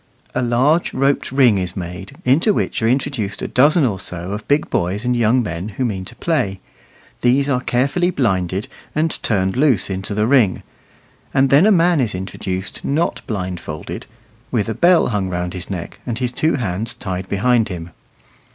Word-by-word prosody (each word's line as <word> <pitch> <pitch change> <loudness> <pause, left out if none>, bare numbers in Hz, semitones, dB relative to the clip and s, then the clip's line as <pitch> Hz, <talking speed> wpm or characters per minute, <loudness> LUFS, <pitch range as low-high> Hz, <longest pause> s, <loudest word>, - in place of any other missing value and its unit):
A 130 - 0
large 130 +8 +2
roped 135 0 +1
ring 125 -7 +4
is 90 0 -4
made, 90 +2 -7
into 160 - +4
which - - -1
are 110 - +2
introduced 125 -5 -1
a - - -1
dozen 145 +4 +4
or 100 -6 -1
so 90 +1 -5
of 105 +1 -5
big 145 +1 +2
boys 95 +6 -1
and 125 0 +1
young 120 +2 +3
men 90 +1 -4
who 130 - +1
mean 95 -5 -3
to - - -10
play; 100 - -1 0.6
these 130 +3 +3
are 125 -3 +1
carefully 140 +9 +1
blinded 95 - 0 0.3
and 155 +1 0
turned 95 -3 0
loose 130 -8 +2
into 95 +2 -3
the 105 +1 +2
ring, 120 -7 +3 0.7
and 135 -1 +3
then 150 +9 +6
a - - +5
man 175 -4 +4
is 110 -6 -1
introduced 95 0 -5
not 155 +5 0
blindfolded; 90 -7 -5 0.4
with 105 -5 0
a 110 - -1
bell 175 - +4
hung 100 -4 -1
round 90 0 -3
his 90 -2 -7
neck, 90 -4 -6
and 120 -3 -3
his 125 -1 -1
two 155 +6 +1
hands 110 -2 -2
tied 95 -1 -5
behind 115 +3 +2
him. 85 -2 -6
115 Hz, 180 wpm, -19 LUFS, 95-135 Hz, 0.7 s, then